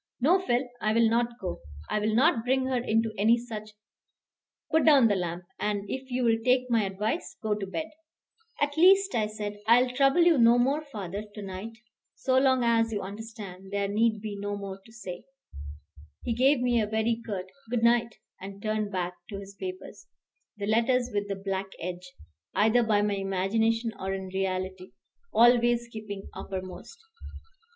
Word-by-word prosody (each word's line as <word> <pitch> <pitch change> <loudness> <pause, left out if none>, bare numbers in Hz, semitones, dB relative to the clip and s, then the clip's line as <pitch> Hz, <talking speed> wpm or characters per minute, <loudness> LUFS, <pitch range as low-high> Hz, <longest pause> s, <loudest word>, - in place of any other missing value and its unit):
"No, 330 +9 +4
Phil, 250 -8 0
I 215 0 +1
will 230 0 +4
not 235 0 0
go. 185 -3 -4 0.3
I - - 0
will 215 +1 0
not 255 -2 +3
bring 260 +1 +1
her 260 -1 0
into 225 -1 +1
any 225 +3 +5
such 215 -3 -7 1.0
Put 320 - +4
down 280 -6 +6
the 205 - +2
lamp, 175 -1 -3 0.2
and, 205 -1 -2
if 265 +3 -5
you 250 0 -1
will 225 -1 +3
take 255 0 +2
my 225 -3 +3
advice, 210 - -3
go 215 -1 +1
to 205 -2 -4
bed." 315 +11 -3 0.7
"At 290 0 0
least," 385 +3 +6
I 215 -2 +1
said, 210 -1 -6
"I 235 +2 +7
will 255 - -3
trouble 275 +6 +4
you 335 -5 +5
no 235 +1 +6
more, 270 +5 +2
father, 205 - -6
to 210 - -6
night. 195 +4 -6 0.4
So 260 0 +2
long 260 -2 +3
as 230 -1 +2
you 205 -3 -2
understand, 200 -2 -9
there 200 0 0
need 215 +1 +1
be 210 -1 -5
no 205 0 -4
more 195 -1 -7
to 225 - -18
say." 195 -6 -8 1.0
He 235 - -1
gave 260 +3 +3
me 240 -2 +2
a 210 - -1
very 220 +2 0
curt 190 -4 -5 0.2
"good 240 -1 -1
night," 235 -1 +3 0.3
and 195 +1 -8
turned 215 0 -2
back 180 -2 -2 0.2
to 200 - -5
his 200 0 -9
papers, 370 - -8 0.5
the 200 - -3
letters 240 +3 +2
with 205 0 -1
the 200 - -2
black 195 0 -3
edge, 180 +1 -6 0.4
either 220 +3 +4
by 215 -3 +2
my 205 -1 0
imagination 220 +4 0
or 190 0 -2
in 190 -1 -6
reality, 185 -1 -3 0.4
always 240 0 +4
keeping 210 -3 -7
uppermost. 185 - -7
220 Hz, 180 wpm, -28 LUFS, 200-245 Hz, 1.0 s, I